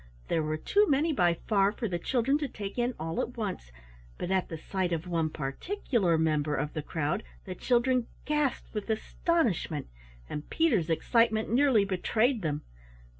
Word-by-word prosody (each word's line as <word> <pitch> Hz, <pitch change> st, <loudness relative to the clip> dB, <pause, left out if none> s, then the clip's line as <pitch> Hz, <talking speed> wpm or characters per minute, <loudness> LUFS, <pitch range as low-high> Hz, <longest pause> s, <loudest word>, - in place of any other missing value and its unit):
There 160 Hz, -, +2 dB
were 155 Hz, 0 st, -1 dB
too 410 Hz, -, +3 dB
many 300 Hz, +3 st, +3 dB
by 175 Hz, -8 st, +3 dB
far 200 Hz, -2 st, +3 dB
for 225 Hz, +2 st, -3 dB
the 175 Hz, -3 st, -2 dB
children 265 Hz, -, +1 dB
to 290 Hz, -, -1 dB
take 205 Hz, -2 st, -6 dB
in 240 Hz, 0 st, 0 dB
all 165 Hz, +1 st, -2 dB
at 245 Hz, +1 st, -5 dB
once, 190 Hz, -, -4 dB, 0.5 s
but 180 Hz, -, -3 dB
at 190 Hz, -1 st, +1 dB
the 165 Hz, -, -5 dB
sight 185 Hz, +2 st, -2 dB
of 165 Hz, 0 st, -1 dB
one 165 Hz, -2 st, 0 dB
particular 175 Hz, -, 0 dB
member 155 Hz, -2 st, +1 dB
of 150 Hz, +2 st, -2 dB
the 155 Hz, -, -2 dB
crowd, 155 Hz, +5 st, -1 dB, 0.2 s
the 185 Hz, -, -5 dB
children 245 Hz, +3 st, +2 dB, 0.2 s
gasped 300 Hz, -3 st, -1 dB
with 210 Hz, 0 st, -4 dB
astonishment; 220 Hz, -, 0 dB, 0.4 s
and 150 Hz, -, -6 dB
Peter's 225 Hz, -, +2 dB
excitement 220 Hz, +6 st, +2 dB
nearly 255 Hz, -6 st, +4 dB
betrayed 220 Hz, +6 st, +1 dB
them. 150 Hz, -3 st, -2 dB
200 Hz, 170 wpm, -29 LUFS, 160-245 Hz, 0.5 s, nearly